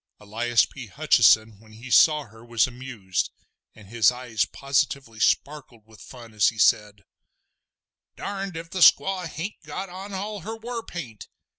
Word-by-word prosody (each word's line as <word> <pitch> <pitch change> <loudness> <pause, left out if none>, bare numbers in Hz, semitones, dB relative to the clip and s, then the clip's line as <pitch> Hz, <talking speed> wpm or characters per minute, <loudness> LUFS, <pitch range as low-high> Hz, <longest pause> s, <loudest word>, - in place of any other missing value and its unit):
Elias 115 +3 +1
P. - - -10
Hutcheson 110 -2 +3
when 110 0 -19
he 120 +4 -11
saw 150 +2 +5
her 115 -2 -17
was 115 -1 +1
amused, 120 -7 -4 0.5
and 105 -3 -15
his 115 0 +3
eyes 125 -3 -2
positively 140 -4 -2
sparkled 130 -4 -1
with 110 -1 -18
fun 120 -3 -13
as 105 -1 +3
he 115 - -1
said: 105 -1 +2 1.1
"Darned 195 -3 -5
if 165 0 -9
the 190 - -4
squaw 185 0 +5
hain't 165 +6 -7
got 195 - -6
on 190 +3 -9
all 205 +2 -5
her 220 +5 -6
war 230 +1 -6
paint! 125 - -9
125 Hz, 155 wpm, -24 LUFS, 110-175 Hz, 1.1 s, saw